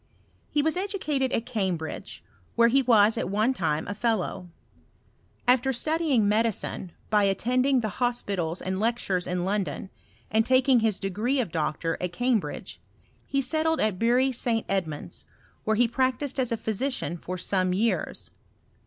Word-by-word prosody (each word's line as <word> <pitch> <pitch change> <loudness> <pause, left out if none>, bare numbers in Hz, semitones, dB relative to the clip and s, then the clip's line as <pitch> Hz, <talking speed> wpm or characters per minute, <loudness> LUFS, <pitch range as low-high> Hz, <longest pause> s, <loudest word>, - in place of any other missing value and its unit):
He 295 - +1
was 320 +3 +1
edu 395 +2 -2
cated 275 -7 0
at 230 - -1
Cambridge 190 -9 -3
y - - -35 0.2
where 235 0 +5
he 270 +3 +4
was 225 -3 +4
at - - -2
one 215 +6 +2
time 160 -9 -1
a 205 - -3
iiUow. 210 -4 -1 1.0
Afiter 255 +1 +3
studying 305 -5 +1
medicine 210 -4 0 0.2
by 210 -1 +4
attending 250 +7 +2
the 215 - -2
hospitals 200 -9 -1
and 190 0 -2
lectures 210 -5 0
in 180 0 -1
London, 195 -1 -2 0.4
and 220 +1 +3
taking 255 +1 +4
his 220 -3 +1
d^ree 215 +8 -1
of 225 -9 -1
doctor 160 +1 -2
at 180 -1 -3
Cambridge^ 245 -1 -1 0.5
he 275 0 0
settled 320 +4 +1
at 210 -4 0
Bury 250 +3 +3
Sc 230 -2 +1
Edmund's, 160 -7 -3 0.4
where 220 - +2
he 240 +2 +4
practised 260 +3 -1
as 250 -3 0
a 230 - 0
physician 220 -2 -2
fos 180 +1 -5
aone 185 -2 +1
years. 225 +3 -1
225 Hz, 155 wpm, -26 LUFS, 190-255 Hz, 1.0 s, where